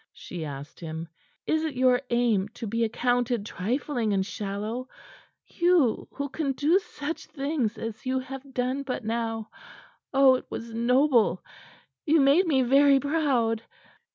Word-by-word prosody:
she 175 -3 -7
asked 145 -1 -8
him. 160 0 -6 0.4
"Is 315 0 +1
it 310 -4 -3
your 250 0 +3
aim 235 -5 +2
to 230 - -6
be 230 +2 -1
accounted 245 0 0
trifling 230 +2 -1
and 190 -1 +1
shallow 210 +5 -4 0.6
you 345 -9 +2
who 280 0 -3
can 280 0 -2
do 310 +8 +3
such 315 -3 -6
things 275 -6 -2
as 225 -1 -6
you 260 0 0
have 270 +1 -7
done 255 +2 0
but 260 -4 -4
now? 225 -1 -2 0.6
Oh, 270 -1 +6
it 255 - -2
was 230 0 -6
noble! 240 - +3 0.6
You 320 0 +3
made 290 +7 +5
me 270 -5 +3
very 275 +2 +5
proud." 270 -7 +1
250 Hz, 145 wpm, -27 LUFS, 225-280 Hz, 0.6 s, Oh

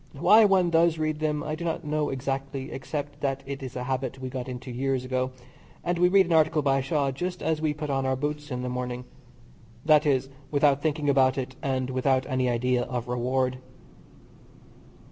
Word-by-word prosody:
Why 185 +9 +6
one 185 -3 +3
does 165 0 +4
read 155 -1 -1
them 150 -1 -1
I 155 - -3
do 155 +2 -5
not 165 -1 -2
know 150 0 0
exactly, 135 0 -3
except 145 +1 -5
that 135 -1 -1
it 140 0 -6
is 130 -1 -7
a 125 - -3
habit 130 +1 -2
we 130 0 -5
got 130 -1 -5
into 125 0 -6
years 130 +1 -1
ago, 130 0 -1 0.5
and 175 0 -1
we 180 0 +5
read 195 0 +5
an 170 - -1
article 155 -1 +3
by 135 -1 +2
Shaw 140 0 0
just 180 +7 -4
as 160 -1 0
we 155 -2 0
put 150 -1 -4
on 135 -1 0
our 130 0 +1
boots 150 +2 -3
in 125 -2 -3
the - - -2
morning 125 0 -4 0.8
that 155 -1 +5
is, 135 -1 +1 0.2
without 145 -1 +3
thinking 150 -1 -1
about 135 -2 +4
it, 130 -1 -4
and 130 -1 -1
without 130 0 +1
any 130 -2 0
idea 125 +1 +1
of 125 -1 -4
reward. 130 +1 0
135 Hz, 200 wpm, -26 LUFS, 130-155 Hz, 0.8 s, Why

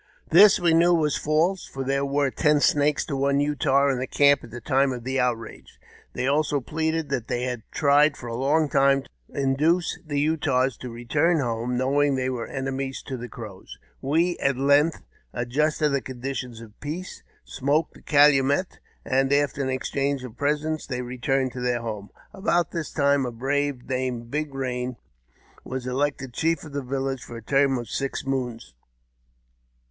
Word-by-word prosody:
This 200 +5 +7
we 170 -2 +3
knew 170 +2 +5
was 150 -3 +1
false, 165 +5 +1
for 135 - -5
their 140 +1 0
were 140 0 +1
ten 150 0 +2
Snakes 145 0 +2
to - - -5
on© 140 +1 +1
Utah 140 -1 +2
in 130 -2 0
the 130 - -3
camp 140 -1 +4
at - - -11
the 120 +2 -8
time 135 0 +2
of 120 -2 -5
the 130 +2 -1
outrage. 120 -3 -3 0.3
They 125 - -2
also 145 +1 +1
pleaded 160 +3 -2
that 120 -2 -2
they 120 - -2
had 125 -2 -3
tried 145 0 +3
for - - -10
a 115 - -5
long 150 +5 +2
time 135 -1 +3
to - - -20 0.3
induce 150 +6 +1
the 145 -3 -2
Utahs 135 -5 +1
to 125 - -7
return 145 +8 +1
home, 120 -1 -2
knowing 140 +2 +2
that 130 - -1
they 130 - 0
were 120 -2 -4
enemies 135 0 -4
to 135 - -5
the 125 0 -7
Crows. 100 - -10 0.2
We 165 +6 +1
at 140 -2 +1
length 145 +4 +3 0.3
adjusted 150 +6 0
the 140 -1 0
conditions 125 -2 -6
of 110 -2 -14
peace, 165 +5 -6 0.2
smoked 145 +4 0
the - - -16
calumet, 145 +3 +3 0.3
and, 135 0 +1
after 140 -1 +1
an 135 - -1
exchange 135 +1 -1
of 125 -3 -9
presents, 150 +3 -1
they 125 -2 -3
returned 130 +1 -1
to 125 - -7
their 125 -1 0
home. 105 -3 -5 0.2
About 175 -3 0
this 165 -3 -4
time 140 -2 +2
a 125 - -3
brave, 135 +2 -2
named 125 -2 -3
Big 150 0 -2
Eain, 125 -2 -3 0.7
was 130 0 -5
elected 135 0 -2
chief 165 +2 0
of 155 - -10
the 140 - -2
village 135 0 -3
for 120 - -9
the 115 -1 -9
term 135 0 +3
of 120 -2 -5
six 135 +6 -3
moons. 125 - -3
135 Hz, 180 wpm, -25 LUFS, 125-150 Hz, 0.7 s, This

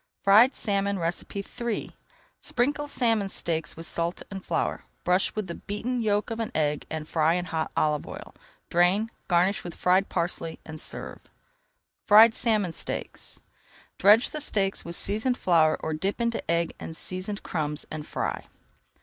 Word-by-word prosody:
FRIED 220 +7 +6
SALMON 200 -1 0
III 200 +6 -3 0.5
Sprinkle 290 +4 0
salmon 225 -7 +1
steaks 160 -4 -3
with 165 - -6
salt 170 +2 -2
and 195 -1 -6
flour, 165 - -2 0.2
brush 180 +2 +1
with 215 -2 -2
the 170 - -5
beaten 230 +7 -3
yolk 210 +1 0
of 225 - -3
an 225 - -2
egg 150 -1 0
and 155 -1 -4
fry 160 +1 +2
in 180 0 -1
hot 160 -3 -2
olive 150 -1 +1
oil. - - -9 0.4
Drain, 185 +6 +3 0.2
garnish 180 +3 +2
with 175 - -7
fried 185 +2 +2
parsley, 170 -2 -2
and 155 -1 -7
serve. - - -5 0.9
FRIED 220 +2 +8
SALMON 215 -8 +1
STEAKS - - -7 0.6
Dredge 210 +6 +6
the 305 - -4
steaks 195 -8 0
with 170 0 -4
seasoned 220 +7 +1
flour 160 -3 +3
or 160 - -2
dip 190 +8 -2
into 235 -1 0
egg 170 0 +1
and 160 - -6
seasoned 185 +3 -4
crumbs 150 -3 -2
and 155 -1 -5
fry. - - -3
190 Hz, 155 wpm, -27 LUFS, 165-215 Hz, 0.9 s, FRIED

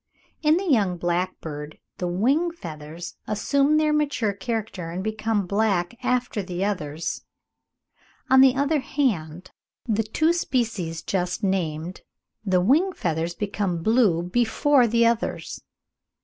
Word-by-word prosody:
In 310 +1 +4
the 385 - -2
young 205 - +2
blackbird 170 -4 -3 0.2
the 180 - -1
wing 260 - +2
feathers 165 - -8
assume 280 +8 +2
their 305 -1 +2
mature 285 -8 0
character 200 -4 -4
and 180 +3 -4
become 220 -1 -1
black 200 -1 0
after 250 -4 0
the 180 0 -3
others; 160 -6 -3 1.0
on 265 0 +6
the 265 -1 +6
other 285 +3 +1
hand, 185 - -2 0.4
in 225 - +1
the 215 - +2
two 310 +10 +1
species 220 - -2
just 180 +1 -2
named 175 -3 -2 0.4
the 185 -3 +2
wing 315 - +3
feathers 165 - -2
become 200 -5 -2
blue 215 -7 +3
before 240 - +3
the 235 +1 +3
others. 230 0 -1
205 Hz, 130 wpm, -24 LUFS, 175-250 Hz, 1.0 s, on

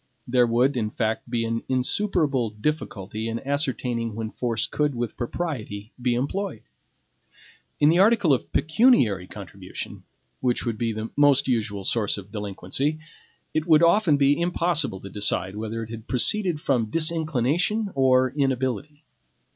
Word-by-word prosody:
There 125 0 +3
would, 125 +4 +2
in 110 -3 -1
fact, 110 0 -2
be 115 -1 0
an 115 0 -2
insuperable 135 - +1
difficulty 110 -3 -3
in 115 +1 -3
ascertaining 125 -5 -1
when 110 0 -4
force 120 -2 -1
could 150 -2 -1
with 120 -2 -3
propriety 120 -7 -4
be 120 -1 +1
employed. 185 +10 -3 1.2
In 145 - +5
the 170 +2 +4
article 205 -6 +5
of 130 - -2
pecuniary 150 - +3
contribution, - - -8 0.4
which 125 -1 0
would 115 -3 -2
be 115 -1 0
the 110 +1 -5
most 140 -1 +4
usual 105 -6 -1
source 105 -3 0
of 100 0 -10
delinquency, 105 - -2 0.6
it 155 +1 -1
would 160 0 +6
often 170 -3 +4
be 140 +3 +3
impossible 170 - 0
to - - -8
decide 100 -2 0
whether 110 +1 -4
it 110 - -9
had 115 0 -8
proceeded 175 - +2
from 125 -7 +1
disinclination 160 - 0
or 130 -1 +3
inability. 135 +1 -2
130 Hz, 145 wpm, -25 LUFS, 110-150 Hz, 1.2 s, would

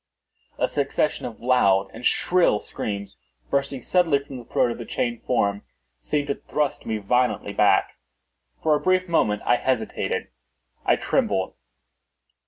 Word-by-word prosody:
A - - +2
succession 145 +1 -1
of 115 - -10
loud 100 -6 +3
and - - -10
shrill 175 -6 +3
screams, 100 -1 -5 0.3
bursting 140 -2 -1
suddenly 175 -6 +3
from 140 -2 -8
the 120 - -12
throat 120 - +1
of 115 - -6
the 120 - -6
chained 120 0 -2
form, 100 -5 +1 0.4
seemed 145 - -2
to - - +2
thrust 150 -2 -1
me 110 -1 -1
violently 125 +4 0
back. - - +3 0.6
For 155 - +4
a 150 - +3
brief 185 0 +2
moment 105 -11 +1
I 120 - +4
hesitated—I 65 - -2
trembled. 95 -1 0
125 Hz, 140 wpm, -24 LUFS, 100-140 Hz, 0.6 s, For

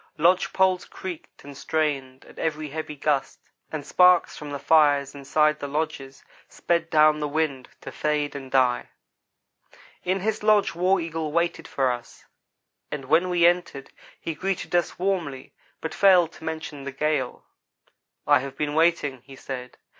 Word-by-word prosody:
Lodge 175 +4 +3
poles 190 -1 +2
creaked 185 -3 -9
and 140 0 -10
strained 140 -4 -2
at - - -15
every 155 -1 -2
heavy 155 +1 -5
gust, 145 -1 -1 0.3
and 150 -3 -5
sparks 180 +2 +4
from 150 - -8
the 145 - -4
fires 145 -2 +3
inside 150 +2 +1
the 145 - -4
lodges 140 -2 -4 0.3
sped 170 -1 -1
down 155 -1 +5
the 150 - -1
wind, 145 -4 -2
to - - -8
fade 150 -1 -1
and 135 -2 -7
die. 130 -2 +2 1.1
In 185 +1 0
his 215 +2 -1
lodge 210 -1 +3
War 185 +3 +2
Eagle 165 -2 -3
waited 170 +2 -1
for 135 -2 +1
us, 120 -1 -8 0.6
and 140 -2 -5
when 165 +7 +3
we 175 -1 +3
entered 175 -6 +1 0.3
he 165 - -4
greeted 190 +4 -3
us 175 -1 +1
warmly, 175 -8 -2 0.3
but 160 - -4
failed 180 -4 +5
to - - -15
mention 160 -3 -5
the 140 - -5
gale. 140 -2 -2 0.8
"I 145 -1 +5
have 135 +1 -7
been 150 -1 -2
waiting," 160 -5 +1
he 135 +1 -14
said. 125 -1 -7
150 Hz, 160 wpm, -25 LUFS, 140-170 Hz, 1.1 s, down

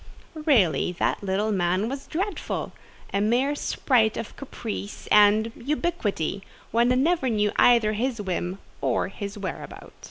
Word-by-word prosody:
Really 195 - +3
that 175 - -1
little 200 +3 0
man 185 +1 +1
was 270 +2 -5
dreadful: 385 +5 -3 0.4
a 200 - +1
mere 245 +7 +2
sprite 240 -6 +1
of 225 - -6
caprice 225 -6 -6
and, 210 +2 +5
ubiquity: 240 - -2 0.3
one 235 +2 +3 0.2
never 325 -5 +2
knew 210 -2 +1
either 230 -3 +5
his 235 +2 -1
whim 185 -1 -3 0.2
or - - 0
his 200 +1 -6
whereabout. 185 -7 -7
215 Hz, 130 wpm, -25 LUFS, 200-260 Hz, 0.4 s, and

